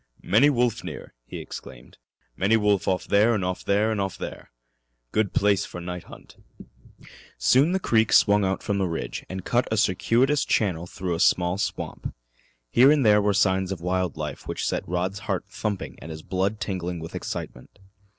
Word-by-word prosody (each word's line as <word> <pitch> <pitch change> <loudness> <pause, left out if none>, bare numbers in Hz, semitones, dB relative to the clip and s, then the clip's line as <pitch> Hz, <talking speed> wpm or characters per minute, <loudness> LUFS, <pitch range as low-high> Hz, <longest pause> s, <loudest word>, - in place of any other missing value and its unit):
"Many 125 +8 +5
wolf 125 -4 +1
near," - - -8
he - - -7
exclaimed. - - -10 0.4
"Many 100 - +3
wolf 105 -2 +1
off 95 -1 0
there 110 +3 +3
'n' 100 - -1
off 90 0 -3
there 105 +3 +2
'n' 110 - -1
off 95 -1 -2
there. - - -7 0.6
Good 110 -3 +1
place 100 -1 +2
for 90 - -7
night 90 -1 -6
hunt." - - -14 1.0
Soon 140 +6 +4
the 190 - +1
creek 110 - +2
swung 105 -1 +5
out 95 0 -1
from 100 -1 -1
the 95 - +1
ridge 85 -1 -4
and 95 0 -6
cut 120 +1 +1
a 110 - +1
circuitous 115 +9 +2
channel 90 -5 0
through 90 0 -4
a 85 - -3
small 90 0 +2
swamp. 105 - -4 0.6
Here 135 - +6
there 105 -2 +5
were 100 -1 +1
signs 95 -1 +2
of 95 - -4
wild 90 0 -1
life - - -6
which - - -3
set - - -2
Rod's 90 +3 -1
heart 95 -1 -1
thumping 100 -1 -4
and 80 - -10
his 80 -1 -8
blood 95 +3 -1
tingling 90 -4 -3
with 80 0 -8
excitement. 60 - -6
100 Hz, 180 wpm, -25 LUFS, 90-110 Hz, 1.0 s, Here